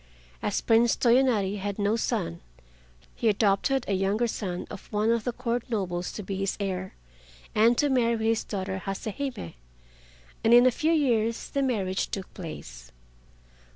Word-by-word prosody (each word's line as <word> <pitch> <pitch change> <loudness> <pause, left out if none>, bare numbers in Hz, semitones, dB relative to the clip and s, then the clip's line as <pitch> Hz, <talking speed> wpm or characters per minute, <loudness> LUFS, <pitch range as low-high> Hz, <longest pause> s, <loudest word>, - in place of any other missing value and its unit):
As - - -1
Prince 230 +1 +4
Toyonari 235 -5 +3
had 200 0 -3
no 205 +1 +1
son, 85 - -2 0.7
he 230 - +1
adopted 215 +6 +2
a 200 - 0
younger 195 +5 +1
son 190 -6 -3
of 200 - -10
one 215 +1 +2
of 230 -2 0
the 245 - 0
Court 240 0 -2
nobles 180 -6 -2
to 210 - -6
be 195 0 -4
his 195 0 -1
heir, 190 -2 -3 0.6
and 230 +3 +4
to 295 - +3
marry 235 -4 +2
his 225 0 +2
daughter 190 -2 -4
Hase 195 +1 -5
Hime, 265 - -4 0.9
and 230 +1 +6
in 245 +1 +7
a 255 - +6
few 310 +6 0
years 230 -8 +1
the 280 - 0
marriage 200 -8 0
took 195 -2 -6
place. - - -9
215 Hz, 160 wpm, -27 LUFS, 195-240 Hz, 0.9 s, in